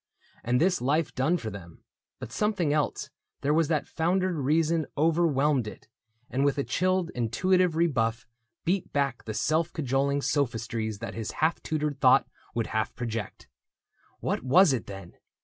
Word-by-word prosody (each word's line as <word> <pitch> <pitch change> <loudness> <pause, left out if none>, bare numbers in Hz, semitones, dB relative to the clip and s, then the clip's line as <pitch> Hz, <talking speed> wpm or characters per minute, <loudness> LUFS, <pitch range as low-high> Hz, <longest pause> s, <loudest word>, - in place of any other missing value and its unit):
And 125 +2 +1
this 180 -1 +2
life 145 +4 +1
done 145 +7 +1
for 110 -8 -5
them; 85 -5 -11 0.3
but - - -8
something 200 -8 0
else 150 -1 -1 0.3
There 145 +2 +1
was 160 0 +3
that 155 -2 0
foundered 185 +3 0
reason, 155 +2 +1
overwhelmed 150 -5 +2
it, 105 - -10 0.4
And 135 +2 -1
with 140 0 +2
a 140 - +1
chilled, 185 +1 0
intuitive 180 +9 +1
rebuff 125 -9 +1 0.4
Beat 185 +2 0
back 140 -5 -1
the 110 -1 -5
self 160 +6 +1
cajoling 140 -1 0
sophistries 115 -5 -1
That 115 - -6
his 115 -2 -5
half 160 +1 0
tutored 150 -2 -2
thought 130 -1 +5 0.3
would 115 -1 0
half 110 0 -1
project. 115 -4 -5 0.7
What - - -1
was 150 +5 +5
it, 120 - -3
then 95 -3 -10
145 Hz, 155 wpm, -27 LUFS, 120-165 Hz, 0.7 s, thought